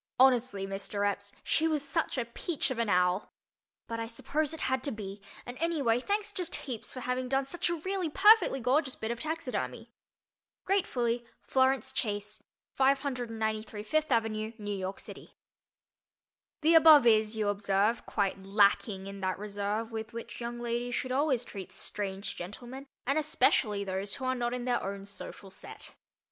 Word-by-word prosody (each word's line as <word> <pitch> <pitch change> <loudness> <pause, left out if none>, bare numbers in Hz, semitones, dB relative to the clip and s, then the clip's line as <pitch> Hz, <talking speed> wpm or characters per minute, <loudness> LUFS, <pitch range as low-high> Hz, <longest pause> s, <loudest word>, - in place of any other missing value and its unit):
Honestly, 250 -6 +4
Mr. 200 +1 -2
Epps, 200 0 -3
she 320 - +2
was 300 -3 -1
such 325 -4 -1
a 245 - 0
peach 270 +6 -2
of 245 - -3
an 230 -2 +1
owl. 180 +1 +2 0.5
But 230 0 -4
I 225 - -3
suppose 285 +6 -1
it 320 - -7
had 260 -1 0
to 285 - 0
be, 205 -2 -7 0.2
and 245 - -6
anyway, 290 -8 +2
thanks 410 +8 -1
just 360 -4 -1
heaps 245 -6 -4
for 255 - -6
having 250 0 -2
done 270 +1 +1
such 345 +5 -1
a 345 - 0
really 370 +1 -2
perfectly 400 -4 +6
gorgeous 260 +3 +1
bit 220 +1 -3
of 235 - -4
taxidermy. 255 -7 -3 0.7
Gratefully, 245 -12 +1 0.2
FLORENCE 265 0 +2
CHASE. 210 -4 -3 0.4
593 230 -6 0
Fifth 310 +8 0
Avenue, 220 -1 0
New 205 -2 -3
York 190 0 -4
City. - - -11 1.3
The 320 +2 +5
above 315 -4 +9
is, 220 -1 +4
you 210 -1 +1
observe, 205 +2 +1
quite 200 -2 0
lacking 200 0 +2
in 195 0 -7
that 185 -1 -1
reserve 205 +2 -3
with 220 0 -5
which 230 +1 -7
young 240 0 -4
ladies 240 +1 -2
should 255 - -2
always 265 -3 +1
treat 195 -3 -8
strange 195 -1 -4
gentlemen 245 +9 -8 0.2
and 275 +4 +2
especially 230 -8 +2
those 195 +1 -3
who 265 - -5
are 255 - +2
not 245 -1 -1
in 245 -1 -4
their 245 -1 +1
own 195 0 -5
social 200 -1 -9
"set." - - -9
235 Hz, 165 wpm, -30 LUFS, 205-270 Hz, 1.3 s, above